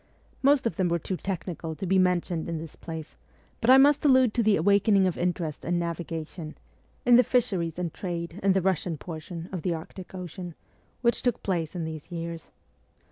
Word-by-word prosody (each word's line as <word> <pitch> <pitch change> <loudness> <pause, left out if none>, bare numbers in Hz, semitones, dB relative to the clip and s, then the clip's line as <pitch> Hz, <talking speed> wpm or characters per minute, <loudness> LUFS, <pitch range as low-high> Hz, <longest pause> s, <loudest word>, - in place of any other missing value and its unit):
Most 280 -1 +4
of 230 - -1
them 185 -3 +2
were 170 - +2
too 185 +3 -3
technical 175 -3 -4
to 195 - -5
be 190 +1 +3
mentioned 180 -2 +1
in 165 - -2
this 160 0 -8
place, 160 -2 -8 0.4
but 240 - 0
I 260 - +10
must 285 +2 +5
allude 260 -5 +5
to 240 - +2
the 215 -2 +4
awakening 200 +2 +4
of 185 - 0
interest 170 -3 -2
in 175 +1 0
navigation, 165 -1 -4 0.5
in 245 -1 +7
the 250 - +7
fisheries 190 -10 0
and 175 -3 -3
trade 170 -1 -5
in 195 0 +4
the 190 - +2
Eussian 180 -3 0
portion 165 +1 -7
of 185 -3 -4
the 170 +1 0
Arctic 180 +3 -9
Ocean, 180 -1 -7 0.5
which 235 -1 +2
took 245 -3 0
place 170 -4 -1
in 175 - -2
these 160 +1 -7
years. 165 -1 -5
180 Hz, 190 wpm, -27 LUFS, 165-200 Hz, 0.5 s, I